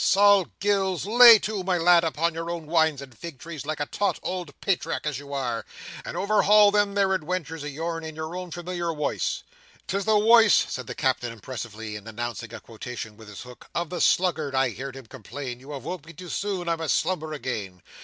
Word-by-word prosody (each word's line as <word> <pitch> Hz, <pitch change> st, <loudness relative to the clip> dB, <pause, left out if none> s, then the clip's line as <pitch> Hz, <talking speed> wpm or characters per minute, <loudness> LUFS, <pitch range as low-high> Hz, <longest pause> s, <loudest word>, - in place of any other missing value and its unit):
Sol 200 Hz, -1 st, +5 dB
Gills, 195 Hz, -3 st, 0 dB
lay 235 Hz, +2 st, +9 dB
to, 210 Hz, -2 st, -3 dB
my 185 Hz, -1 st, +1 dB
lad, 170 Hz, 0 st, +5 dB
upon 165 Hz, +1 st, 0 dB
your 165 Hz, +1 st, -5 dB
own 170 Hz, -2 st, -4 dB
wines 160 Hz, -3 st, +2 dB
and 130 Hz, -3 st, -14 dB
fig 165 Hz, -1 st, -8 dB
trees 150 Hz, 0 st, -8 dB
like 155 Hz, -1 st, -3 dB
a 145 Hz, -, 0 dB
taut 205 Hz, +7 st, -1 dB
ould 180 Hz, -4 st, -4 dB
patriark 195 Hz, -5 st, -1 dB
as 150 Hz, -3 st, -2 dB
you 140 Hz, 0 st, -11 dB
are, 120 Hz, -5 st, -2 dB, 0.4 s
and -, -, -6 dB
overhaul 210 Hz, 0 st, +5 dB
them 205 Hz, -1 st, +2 dB
there 200 Hz, -1 st, +3 dB
adwentures 165 Hz, -2 st, -3 dB
o' -, -, -4 dB
yourn, 165 Hz, +3 st, -4 dB
in 160 Hz, -1 st, -7 dB
your 160 Hz, +2 st, -5 dB
own 180 Hz, 0 st, -5 dB
formilior 175 Hz, 0 st, -4 dB
woice. 150 Hz, -1 st, -2 dB, 0.4 s
"Tis 195 Hz, 0 st, -2 dB
the 220 Hz, -1 st, +4 dB
woice," 225 Hz, 0 st, +6 dB
said 130 Hz, -3 st, -1 dB
the -, -, -6 dB
Captain, 130 Hz, -2 st, 0 dB
impressively, 115 Hz, -2 st, -7 dB
and 105 Hz, +1 st, -9 dB
announcing 120 Hz, +1 st, -5 dB
a -, -, -7 dB
quotation 115 Hz, -1 st, -8 dB
with 110 Hz, 0 st, -14 dB
his 105 Hz, -1 st, -9 dB
hook, 125 Hz, -1 st, -13 dB
"of 170 Hz, -1 st, -2 dB
the 180 Hz, -, -3 dB
sluggard, 160 Hz, -6 st, +2 dB
I 130 Hz, -1 st, +3 dB
heerd 135 Hz, +2 st, -7 dB
him 135 Hz, -2 st, -10 dB
complain, 125 Hz, +1 st, -7 dB
you 135 Hz, +3 st, -14 dB
have 140 Hz, -4 st, -6 dB
woke 175 Hz, -4 st, -6 dB
me 170 Hz, -, -10 dB
too 180 Hz, 0 st, -10 dB
soon, 195 Hz, -3 st, -3 dB
I 165 Hz, -1 st, +1 dB
must 160 Hz, -2 st, +1 dB
slumber 160 Hz, -4 st, -2 dB
again. 105 Hz, -, -5 dB
160 Hz, 215 wpm, -25 LUFS, 130-185 Hz, 0.4 s, lay